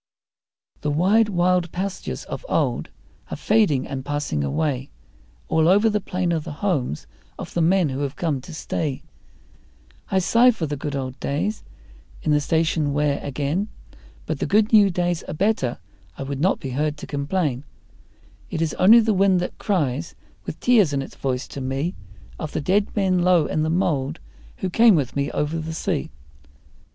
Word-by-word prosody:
The 150 - -1
wide, 195 +9 +3
wild 180 -2 +1
pastures 190 +2 -4
of - - -7
old - - 0 0.4
are - - -5
fading 200 -12 +2
and 135 -1 -5
passing 145 - -2
away, 130 - -1 0.6
All 160 0 +2
over 205 +5 +5
the 210 0 0
plain 180 -2 -1
are 165 - +1
the 150 - -7
homes 145 - -2 0.3
of - - -8
the 170 - 0
men 175 -1 +3
who 130 +1 -4
have 140 0 -3
come 155 -6 -1
to 170 - -11
stay 155 -2 -3 1.1
I 190 - +1
sigh 230 +7 +5
for 220 -9 0
the 145 -1 -3
good 145 0 -4
old 130 -1 -4
days 180 +10 -2 0.6
in 155 - +1
the 150 0 +3
station 160 -2 +1
whare 145 -1 +1
again; 145 +8 -2 0.6
But - - -3
the - - -1
good 215 +2 +2
new 205 -2 +7
days 175 -1 -1
are - - -5
better 190 - 0 0.4
I - - -4
would 135 0 -4
not 185 +4 +2
be 135 - -5
heard 150 +3 -1
to - - -8
complain; 145 -2 -1 0.9
It - - -3
is 165 -1 0
only 225 +6 +8
the 220 -1 +2
wind 190 -1 +3
that 180 - -5
cries 160 - -1 0.3
with - - -5
tears 215 -11 +4
in 135 -1 0
its - - -10
voice 130 -1 -3
to 140 - -6
me 135 +7 -2 0.5
Of 155 - -5
the - - -1
dead 200 +7 +2
men 190 -3 +2
low 175 -3 +4
in 155 - -1
the 155 - 0
mould 160 -6 0 0.4
who 190 - -2
came 225 +1 +6
with 140 -5 -1
me 140 0 0
over 155 +2 -2
the 160 0 -5
sea. 170 -3 -2
160 Hz, 180 wpm, -23 LUFS, 140-190 Hz, 1.1 s, only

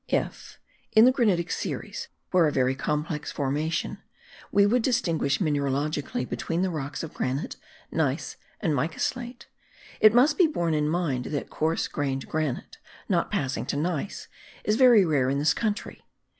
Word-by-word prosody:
If, - - -2 0.4
in 220 +2 +8
the 255 - +7
granitic 200 -10 +1
series, 475 -1 -4 0.2
where 180 -3 +5
a - - +1
very 130 -1 +2
complex 150 +2 -2
formation, 150 +4 -2 0.5
we 200 0 +5
would 240 +4 +3
distinguish 165 - +1
mineralogically 145 -4 -1
between 170 +2 -2
the 190 - 0
rocks 145 -2 -4
of 160 - -7
granite, 130 +4 -2 0.4
gneiss, - - -1 0.2
and 165 -8 0
mica 145 +4 -1
slate, 245 -1 -3 0.5
it 215 +1 +6
must 280 +7 +4
be 355 - +7
borne 170 - -1
in 150 -1 +1
mind 155 -7 -1
that 145 - -4
coarse 160 +2 0
grained 135 -2 -3
granite, 155 -5 -3 0.3
not - - +1
passing 130 -1 -2
to - - -1
gneiss, 170 +3 -3 0.4
is 210 - +2
very 240 -5 +7
rare 140 -6 +2
in 140 - 0
this 150 +1 +3
country. 215 +1 -3
160 Hz, 155 wpm, -26 LUFS, 145-205 Hz, 0.5 s, in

